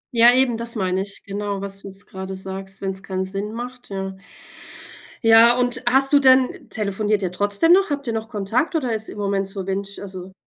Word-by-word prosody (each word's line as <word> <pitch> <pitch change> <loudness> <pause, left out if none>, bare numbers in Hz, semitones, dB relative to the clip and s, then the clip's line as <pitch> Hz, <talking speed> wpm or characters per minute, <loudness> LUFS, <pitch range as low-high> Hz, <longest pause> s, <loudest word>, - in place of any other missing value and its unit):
Ja, 235 +1 +7
eben, 250 -2 +2
das 235 +1 -5
meine 185 -2 0
ich, 200 +1 -6
genau, 200 0 -4
was 195 0 -6
du - - -10
jetzt 195 +1 -9
gerade 190 0 -7
sagst, 190 0 -8
wenn 195 -1 -1
es 190 0 -7
keinen 190 -1 -3
Sinn 195 +2 -3
macht, 250 +2 -8
ja. 195 -1 -5 1.1
Ja, 225 +2 +7
und 245 -1 0
hast 270 +2 +5
du 290 - +6
denn 260 -2 +3
telefoniert 210 -1 -1
ihr 185 -2 -2
trotzdem 205 - +2
noch? 385 +1 +5
Habt 285 -2 -3
ihr 230 - -1
noch 220 0 -3
Kontakt 225 - -1
oder 255 -7 0
ist 220 0 -2
im - - -9
Moment 200 -1 -1
so 195 -1 -6
windst 195 +1 -4
also 190 -1 -8
205 Hz, 210 wpm, -21 LUFS, 195-240 Hz, 1.1 s, Ja